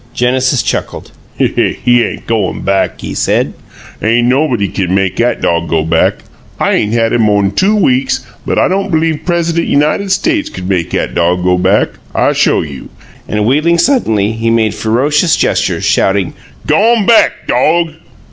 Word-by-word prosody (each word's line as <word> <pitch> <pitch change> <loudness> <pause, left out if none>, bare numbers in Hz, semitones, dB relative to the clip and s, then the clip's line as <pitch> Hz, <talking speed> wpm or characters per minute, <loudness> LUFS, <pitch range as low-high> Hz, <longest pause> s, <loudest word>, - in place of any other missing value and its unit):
Genesis 130 +1 +1
chuckled. - - -4 0.3
"He 120 -1 +1
ain' - - -5
goin' 110 -5 -2
back," 95 0 -1
he - - -5
said. - - 0 0.5
"'Ain' 120 +2 +2
nobody 125 -6 +1
kin 95 -1 -2
make 95 -1 -1
'at 120 +1 0
dog 85 0 0
go 80 -1 +1
back. 80 - 0 0.4
I - - +1
'ain' 105 - 0
had 115 -1 +1
him 120 - +2
mo'n 100 -2 +1
two 195 - +1
weeks, 130 -8 0 0.2
but - - -2
I - - +3
don' 195 +2 -1
b'lieve 160 -2 0
Pres'dent 170 -1 0
United 155 +7 +1
States 315 - 0
kin 90 0 -7
make 90 -4 -1
'at - - -2
dog 90 +1 0
go 90 0 +2
back! 95 +3 +2 0.3
I - - +2
show - - +1
you." 70 -3 -9 0.4
And, 105 -1 -1
wheeling 155 +8 +2
suddenly, 110 - +1
he 115 +1 -2
made 115 -2 +1
ferocious 145 +9 +1
gestures, - - 0
shouting. 95 -2 +1 0.3
"G'on 210 +7 +2
back, 230 +1 +3
dog!" 160 +6 +1
120 Hz, 165 wpm, -12 LUFS, 100-160 Hz, 0.5 s, I